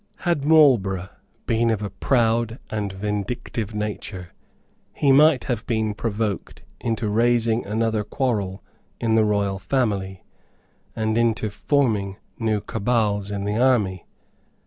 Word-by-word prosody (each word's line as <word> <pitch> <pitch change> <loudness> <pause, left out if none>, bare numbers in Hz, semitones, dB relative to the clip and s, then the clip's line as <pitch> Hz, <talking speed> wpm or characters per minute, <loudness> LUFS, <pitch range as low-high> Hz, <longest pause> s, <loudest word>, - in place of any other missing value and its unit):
Had 170 -5 +1
Marlborough 115 - +4 0.4
been 115 0 +2
of 110 -2 0
a 100 - -4
proud 115 0 +1
and 105 -2 -2
vindictive 105 +2 -4
nature 105 -4 -5 0.6
he 140 - +2
might 145 -1 +5
have 120 -5 -2
been 110 -2 0
provoked 105 -2 -3 0.2
into 115 -1 -2
raising 115 +1 +2
another 110 0 0
quarrel 105 -6 -2 0.4
in 115 -1 +1
the 110 -1 +5
royal 100 -2 0
family, 100 -6 -1 0.7
and 110 +1 0
into 110 -2 +1
forming 105 -4 0 0.2
new 110 -3 0
cabals 105 -3 0
in 100 -1 -3
the 105 +1 -1
army. 110 -8 +2
110 Hz, 125 wpm, -23 LUFS, 100-120 Hz, 0.7 s, might